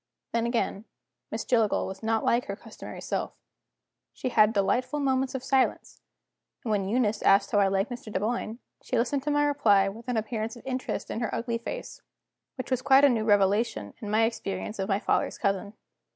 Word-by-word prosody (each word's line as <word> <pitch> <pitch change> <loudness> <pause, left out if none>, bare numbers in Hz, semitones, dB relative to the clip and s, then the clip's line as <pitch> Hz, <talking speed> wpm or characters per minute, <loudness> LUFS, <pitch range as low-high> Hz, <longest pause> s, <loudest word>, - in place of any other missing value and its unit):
Then, 230 0 0
again, 230 -3 -1 0.4
Miss - - -4
Jillgall 225 -4 +2
was 190 0 -7
not 220 0 0
like 240 +1 +2
her 200 - -4
customary 220 +1 -10
self. - - -3 0.8
She - - -3
had 215 -3 +5
delightful 245 +7 0
moments 265 -1 0
of 260 - -4
silence; 265 -1 0 0.6
and 225 - -2
when 195 -2 0
Eunice 225 -2 +1
asked 195 +1 +4
how 205 - +3
I 200 - +4
liked 195 +4 0
Mr. 240 -3 -7
Dunboyne, 220 +3 -2 0.2
she 255 - -2
listened 260 +4 +1
to 290 - -3
my 290 0 +3
reply 205 -9 +3
with 225 +4 -11
an 250 -2 0
appearance 220 +1 -3
of 240 - -14
interest 260 -1 -3
in - - -3
her 235 -3 -1
ugly 230 0 -2
face 235 - -7 0.5
which 255 0 -6
was 255 -1 +1
quite 275 +1 +6
a - - +6
new 225 -4 0
revelation 200 - +2
in 210 - -6
my 215 +2 +3
experience 220 -2 -3
of 195 +1 -2
my 195 - +3
father's - - 0
cousin. 200 +1 -1
225 Hz, 195 wpm, -27 LUFS, 205-250 Hz, 0.8 s, quite